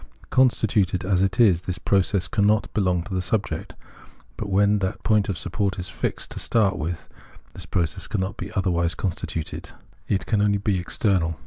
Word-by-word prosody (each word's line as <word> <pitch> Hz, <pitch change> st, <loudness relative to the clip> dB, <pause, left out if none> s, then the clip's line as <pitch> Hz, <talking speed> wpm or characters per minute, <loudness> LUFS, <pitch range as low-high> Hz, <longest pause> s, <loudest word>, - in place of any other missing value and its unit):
Constituted 105 Hz, -8 st, +2 dB
as 95 Hz, -1 st, +2 dB
it 95 Hz, +2 st, 0 dB
is, 95 Hz, -8 st, +5 dB
tbis 90 Hz, 0 st, -4 dB
process 95 Hz, -1 st, +2 dB
cannot 105 Hz, +4 st, +1 dB
belong 90 Hz, -4 st, +1 dB
to 95 Hz, -, -11 dB
tbe 95 Hz, -1 st, 0 dB
subject; 105 Hz, +3 st, -2 dB, 0.6 s
but 105 Hz, -, -5 dB
when 100 Hz, +2 st, +3 dB
that 95 Hz, -1 st, -3 dB
point 105 Hz, -3 st, +2 dB
of 95 Hz, -, -2 dB
support 95 Hz, +3 st, -2 dB
is 90 Hz, -1 st, -4 dB
fixed -, -, -3 dB
to -, -, -4 dB
start 110 Hz, -5 st, +2 dB
wdth, 80 Hz, +2 st, -4 dB, 0.5 s
this -, -, -7 dB
process 85 Hz, -4 st, -1 dB
cannot 95 Hz, -1 st, -2 dB
be -, -, -7 dB
otherwise 85 Hz, -3 st, +1 dB
constituted, 85 Hz, -4 st, -4 dB, 0.4 s
it 95 Hz, -, 0 dB
can 105 Hz, -3 st, +1 dB
only 100 Hz, -1 st, +3 dB
be 100 Hz, -2 st, 0 dB
external. 85 Hz, -3 st, 0 dB
95 Hz, 175 wpm, -24 LUFS, 90-105 Hz, 0.6 s, is